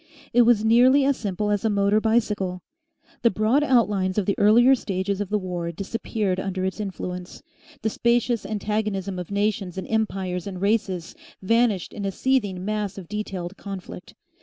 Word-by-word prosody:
It 245 - +6
was 230 -2 +4
nearly 255 +5 +5
as 280 0 +3
simple 210 -2 -2
as 205 -1 0
a 225 - +2
motor 205 +1 +2
bicycle. 210 -5 0 0.6
The 235 - +5
broad 225 +8 +2
outlines 205 -8 +2
of 205 - +1
the 200 - +2
earlier 235 +6 +6
stages 200 -4 -2
of 200 - -4
the 210 - +1
war 175 -3 -4
disappeared 195 +1 -2
under 190 -1 -2
its 190 +3 -3
influence, 180 -3 -6 0.4
the 220 - +2
spacious 235 0 +1
antagonism 205 -3 -2
of 180 - -6
nations 200 -2 -1
and 190 - -4
empires 195 -5 -2
and 185 -2 -6
races 200 -4 -1 0.3
vanished 225 -3 +1
in 205 - -6
a 195 - -1
seething 205 -6 0
mass 210 -2 -2
of 185 -3 -8
detailed 195 -3 -5
conflict. 195 -2 -8
205 Hz, 165 wpm, -24 LUFS, 190-220 Hz, 0.6 s, It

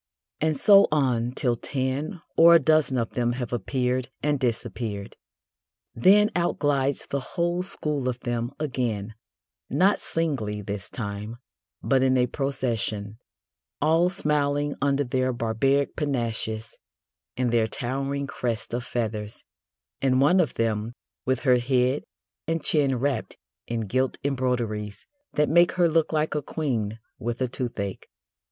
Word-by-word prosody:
And 155 -1 +1
so 200 +6 +7
on 125 -5 +1
till 125 -3 +1
ten 135 - -3
or 170 +1 +8
a - - +8
dozen 155 -3 +3
of 115 -2 -1
them 120 -1 0
have 125 -1 -4
appeared 125 +2 -1
and 145 -1 +1
disappeared. 115 -4 -3 0.8
Then 205 - +5
out 175 -1 +1
glides 140 -2 +1
the 140 - -2
whole 175 +6 -1
school 150 -8 -2
of 125 -1 -4
them 120 -1 -2
again 120 -8 -2 0.6
not 195 +3 +3
singly 120 -11 -2
this 100 -2 -5
time, 105 0 -5 0.5
but 135 -1 +3
in 130 0 +3
a 125 - +4
procession, 115 -6 -2 0.6
all 165 +4 +3
smiling 145 -3 0
under 140 0 +2
their 130 0 0
barbaric 125 +4 +1
panaches 115 -5 -2 0.6
and 125 -2 +1
their 115 -2 +3
towering 135 +4 -3
crest 115 -5 -3
of 120 0 -1
feathers, 110 -4 -4 0.6
and 130 -1 +3
one 175 +8 +5
of 170 - +1
them 115 0 -1 0.3
with 130 0 +1
her 130 -3 +4
head 130 +2 +1 0.4
and 165 -1 -1
chin 140 -4 +2
wrapped 130 -2 -2 0.3
in 115 -1 -2
gilt 130 +5 0
embroideries 120 -7 -2 0.3
that 150 0 +2
make 175 +2 +4
her 175 -2 +3
look 165 -1 +2
like 155 0 0
a 150 - -1
queen 120 -8 -2 0.2
with 120 +1 -3
a 130 - +1
toothache. 115 -6 -4
130 Hz, 140 wpm, -26 LUFS, 115-145 Hz, 0.8 s, or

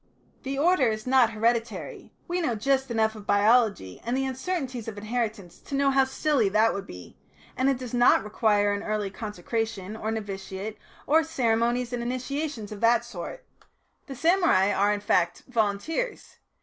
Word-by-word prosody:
The 270 -1 -4
order 305 -3 +3
is 215 -1 -2
not 255 -2 +4
hereditary 225 -2 -2 0.2
we 355 0 -1
know 245 -8 0
just 265 +4 0
enough 220 -2 +1
of 210 -2 -12
biology 205 - +2
and 240 +3 -1
the 270 - 0
uncertainties 260 - -3
of 215 -2 -6
inheritance 215 -4 -4
to 280 - -6
know 275 0 +3
how 270 0 +4
silly 265 -4 +1
that 215 +3 +3
would 195 0 -5
be 90 -1 -11 0.4
and 260 +1 +2
it 270 - +1
does 250 -2 -8
not 245 -4 +5
require 210 -1 +2
an 200 - -3
early 210 -2 -2
consecration 210 0 -4
or 220 0 -4
novitiate 205 -1 -5 0.3
or 320 +3 +4
ceremonies 240 -4 0
and 245 - -2
initiations 255 -1 -4
of 210 - -8
that 235 0 +4
sort. 240 - -8 0.6
The 270 - -7
samurai 325 - +3
are, 205 +1 +2
in 205 -1 -1
fact, 175 -4 +1
volunteers. 240 - -2
230 Hz, 165 wpm, -26 LUFS, 210-265 Hz, 0.6 s, not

